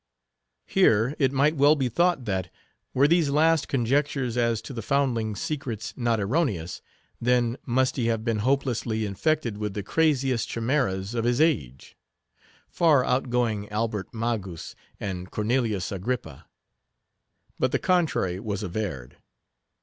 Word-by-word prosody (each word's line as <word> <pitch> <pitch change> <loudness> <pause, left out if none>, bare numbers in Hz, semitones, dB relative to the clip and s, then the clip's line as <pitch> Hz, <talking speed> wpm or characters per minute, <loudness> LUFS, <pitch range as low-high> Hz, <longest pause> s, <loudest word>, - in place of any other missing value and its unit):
Here, 125 - +3
it 135 -3 +3
might 140 +3 +2
well 145 +1 +5
be 135 -4 0
thought 170 +2 +1
that, 95 -3 -2 0.4
were 135 +2 +4
these 165 -2 +3
last 155 +2 +3
conjectures 135 0 0
as 115 -2 +1
to 135 - -8
the 115 - -4
foundling's 115 -5 0
secrets 125 -8 -4
not 120 -3 0
erroneous, 100 - -1 0.4
then 120 -1 +2
must 130 +2 +1
he 120 -3 0
have 115 -1 -1
been 115 -3 0
hopelessly 120 -3 0
infected 115 +1 -1
with 105 -2 -3
the 105 - -3
craziest 135 -3 +1
chimeras 115 -5 -1
of 115 -1 -1
his 120 +1 +1
age; 70 - 0 0.7
far 150 -7 +3
outgoing 120 -5 0
Albert 105 -2 -2
Magus 110 -7 -4 0.3
and 95 -2 -5
Cornelius 110 -3 -1
Agrippa. 105 +6 -4 1.1
But - - +1
the - - +2
contrary 160 - +1
was 105 -1 -4
averred. 90 - -4
120 Hz, 135 wpm, -26 LUFS, 105-140 Hz, 1.1 s, well